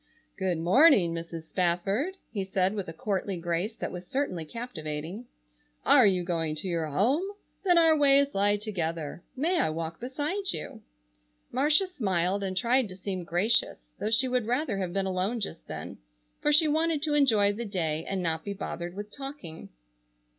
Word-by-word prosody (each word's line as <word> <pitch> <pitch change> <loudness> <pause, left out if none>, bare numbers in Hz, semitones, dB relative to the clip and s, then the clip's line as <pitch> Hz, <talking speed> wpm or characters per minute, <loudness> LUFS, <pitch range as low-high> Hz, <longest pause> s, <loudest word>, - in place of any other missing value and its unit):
"Good 185 -3 -1
morning, 185 - +5
Mrs. 165 -1 -6
Spafford," 195 - 0
he 205 -3 -2
said, 190 0 0
with 200 -3 -4
a - - -5
courtly 195 +2 -2
grace 175 +6 -2
that - - -4
was 180 0 -8
certainly 185 - -2
captivating, 170 -1 -6 0.6
"are - - +7
you 185 -2 +2
going 165 -3 -1
to 155 +5 -2
your 165 -3 -1
home? 220 - +2 0.4
Then 355 -3 +4
our 325 -1 +6
ways 280 -1 +4
lie 205 +1 +2
together. 170 -7 -4
May 335 +7 +1
I - - +2
walk 165 +1 -4
beside 295 +10 -2
you?" - - -7 0.7
Marcia 295 +8 +3
smiled 195 - 0
and 190 -1 -3
tried 245 0 +2
to 185 - -9
seem 190 -1 -4
gracious, 180 +8 0
though 205 +3 -1
she 230 +4 +3
would 250 -3 0
rather 245 -4 0
have 185 -2 -2
been 195 +1 -1
alone 190 +5 -1
just - - -5
then, - - -7 0.4
for 295 - +2
she 310 +1 +5
wanted 315 0 +1
to 305 -2 +1
enjoy 220 -9 +4
the 230 +3 -5
day 165 -7 -2
and 190 -2 -3
not 160 -1 -1
be 200 - -4
bothered 175 -2 -5
with 205 +1 -7
talking. 270 - -8
200 Hz, 175 wpm, -28 LUFS, 175-260 Hz, 0.7 s, are